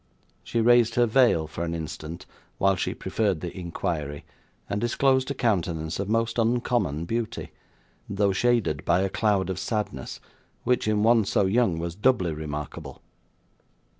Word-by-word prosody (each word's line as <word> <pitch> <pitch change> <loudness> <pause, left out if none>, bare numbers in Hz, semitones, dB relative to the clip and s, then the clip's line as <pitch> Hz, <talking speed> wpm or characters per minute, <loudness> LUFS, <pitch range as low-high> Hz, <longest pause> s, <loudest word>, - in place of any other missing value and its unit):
She 115 - -1
raised 120 0 +4
her 120 - +4
veil, 115 -9 +3
for 80 +2 -5
an 85 0 -2
instant, 80 0 -6 0.3
while 95 0 +3
she - - -2
preferred 95 -3 -1
the 85 - -6
inquiry, 80 -5 -4 0.4
and 100 - -2
disclosed 130 +2 +2
a 140 - -2
countenance 85 -9 -1
of 100 0 -3
most 115 +1 0
uncommon 115 - 0
beauty, 115 +4 -3 0.6
though 100 0 +1
shaded 105 -9 +1
by 85 +2 +2
a 95 - 0
cloud 100 -3 +1
of 95 - -4
sadness, 100 - -3 0.4
which, 125 -3 +1
in 105 -1 +2
one 115 0 +5
so 100 0 +1
young, 95 -3 +2
was 85 0 -3
doubly 105 -4 +2
remarkable. 75 -1 -6
100 Hz, 150 wpm, -26 LUFS, 85-115 Hz, 0.6 s, one